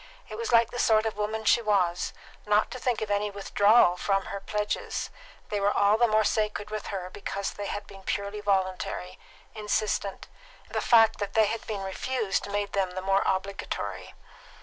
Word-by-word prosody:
It 215 - -6
was 230 +2 -3
like 230 -1 +5
the 245 - -5
sort 220 -1 +4
of 220 - -2
woman 215 +1 -3
she 235 - +5
was, 185 -5 +1 0.4
not 210 0 +3
to 255 - -6
think 240 -3 0
of 210 - -4
any 205 +1 +1
withdrawal 200 -1 +4
from 195 +1 0
her 200 - -5
pledges; 210 +1 -3 0.4
they 205 - -1
were 200 +1 +2
all 205 +1 +4
the 240 +2 +4
more 215 0 +3
sacred 210 -1 -1
with 215 -1 -4
her 185 -2 -5
because 200 0 -4
they 205 -1 -5
had 205 +1 -4
been 195 -1 -13
purely 200 +2 -3
voluntary, 185 -2 -1 0.3
insistent; 210 -2 -2 0.4
the - - -2
fact 225 -2 +5
that 200 -1 -3
they 220 -1 +6
had 225 +2 -4
been 205 -3 -3
refused 205 +1 -2
made 205 0 -2
them 195 -2 +1
the 185 - -3
more 195 +1 +2
obligatory. 195 +1 -3
205 Hz, 185 wpm, -27 LUFS, 195-215 Hz, 0.4 s, they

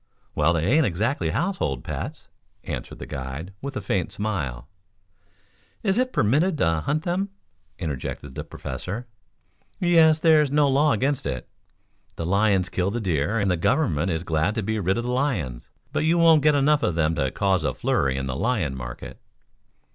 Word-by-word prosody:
"Well, 85 - +3
they 85 -1 0
ain't 145 - +4
exactly 95 - -1
household 85 - -1
pets," - - -6 0.4
answered - - -6
the - - -7
guide, 70 +8 -6
with 140 0 -5
a - - -3
faint 95 -1 -1
smile. 95 - -3 1.2
"Is 200 +1 +2
it 255 0 +1
permitted 155 - +2
to 80 - +1
hunt 155 +2 -1
them?" 185 +3 -1 0.5
interjected 70 -4 -5
the - - -5
Professor. 105 +7 -6 0.7
"Yes, 165 -3 +5
there's 155 -2 +4
no 145 +1 +3
law 140 +2 +3
against 135 - 0
it. 65 -2 -4 0.7
The 85 - -4
lions 100 0 +2
kill 95 -1 -1
the 115 +4 -2
deer 90 0 0
and 100 -3 +1
the 90 - +1
government 85 - +1
is 80 -2 -1
glad 80 +5 0
to 115 - -1
be 110 +2 -1
rid 95 +1 +1
of 120 - -1
the 125 - -2
lions. 110 - -2 0.2
But - - +1
you 165 +2 +3
won't 165 -2 +6
get 150 0 +4
enough 145 +1 +3
of 90 - 0
them 80 -1 +2
to 70 -4 0
cause 95 +1 +1
a 65 - +1
flurry 65 -1 0
in 65 - -2
the 65 -1 -3
lion 95 - 0
market." - - -8
100 Hz, 175 wpm, -24 LUFS, -, 1.2 s, won't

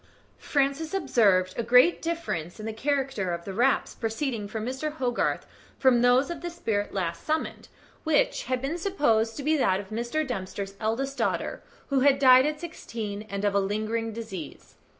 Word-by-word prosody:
Francis 285 +5 0
observed 200 - +3
a - - -1
great 250 +9 +5
difference 325 - -3
in 215 - -6
the 220 - -3
character 265 -6 -1
of 170 0 -4
the 195 - -5
raps 245 +6 +2
proceeding 225 -1 -3
from 215 +1 -4
Mr. 265 +5 -3
Hogarth 250 -5 -1 0.3
from 255 -3 +4
those 250 +5 +4
of 340 - -6
the 350 - -4
spirit 220 -12 -2
last 170 -3 -3
summoned, 315 +1 -2 0.4
which - - +1
had 255 0 -2
been 315 +6 -2
supposed 235 - +1
to 285 - -5
be 310 +3 +2
that 190 -8 +2
of 195 -1 -8
Mr. 240 +8 -1
Dempster's 195 -4 -5
eldest 260 +5 -2
daughter, - - -1 0.3
who 275 -1 +2
had 275 +1 +5
died 260 0 +7
at 300 0 -3
sixteen, 225 -11 -6
and 200 +1 -3
of 205 - +2
a 200 - +3
lingering 215 +3 -1
disease. 210 -8 -8
245 Hz, 175 wpm, -27 LUFS, 210-285 Hz, 0.4 s, died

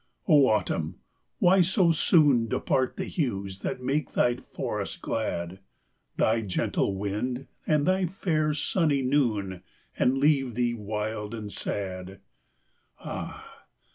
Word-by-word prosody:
Oh, 145 -6 +6
Autumn! 80 -8 0 0.4
why 185 +2 +5
so 180 0 +3
soon 145 -7 +4
Depart 130 +3 0
the 190 - -2
hues 100 - -2
that 125 - -4
make 140 +3 -1
thy 120 - +3
forests - - -5
glad; 95 -5 -3 0.6
Thy 110 +1 +2
gentle 100 -1 -1
wind 110 +7 -3 0.2
and 150 -2 +3
thy 185 +1 +2
fair 155 -4 0
sunny 150 -2 +1
noon, 110 -9 0 0.3
And 130 +2 +2
leave 135 -4 +2
thee 120 -1 +1
wild 105 0 -4
and 105 -2 -6
sad! 95 -1 -4 0.8
Ah! - - -7
125 Hz, 120 wpm, -27 LUFS, 105-150 Hz, 0.8 s, Oh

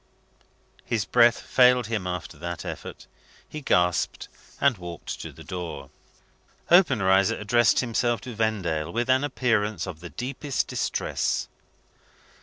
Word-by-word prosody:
His 110 -4 -1
breath 120 -1 +4
failed 125 -1 +4
him 105 -4 -3
after 90 -4 -5
that 85 +1 -5
effort; - - -7 0.4
he 155 - -7
gasped, 90 -9 +1 0.3
and 135 -7 +2
walked 85 -2 -7
to - - -7
the - - -13
door. 85 -7 -6 0.8
Obenreizer 110 - +4
addressed 120 +2 +3
himself 120 -1 0
to 125 - -7
Vendale 90 -8 -1
with 120 +4 0
an 130 +2 +3
appearance 110 -7 0
of 90 -5 -7
the 85 - -9
deepest 130 - -3
distress. - - -1
110 Hz, 125 wpm, -25 LUFS, 90-125 Hz, 0.8 s, breath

